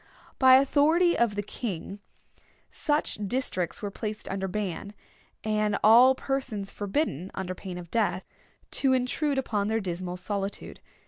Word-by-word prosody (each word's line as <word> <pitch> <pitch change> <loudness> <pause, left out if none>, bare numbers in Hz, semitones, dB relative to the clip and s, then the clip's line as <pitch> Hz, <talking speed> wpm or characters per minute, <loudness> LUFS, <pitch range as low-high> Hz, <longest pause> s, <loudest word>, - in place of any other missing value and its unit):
By 260 -1 +8
authority 310 +6 +4
of 235 -3 +1
the 205 - -2
king 200 -2 -5 0.7
such 295 -6 0
districts 195 -7 -2
were 205 - -3
placed 215 +1 -5
under 195 0 -2
ban, 200 +1 -4 0.5
and 215 -1 +1
all 245 +5 +7
persons 260 -8 -3
forbidden, 195 - -2
under 185 -1 -3
pain 185 -1 -7
of 175 -2 -9
death, 210 -5 0 0.6
to 270 -2 +4
intrude 270 +3 0
upon 210 -6 -1
their 220 +1 +1
dismal 180 -2 -4
solitude. 200 +1 -4
210 Hz, 135 wpm, -27 LUFS, 190-260 Hz, 0.7 s, By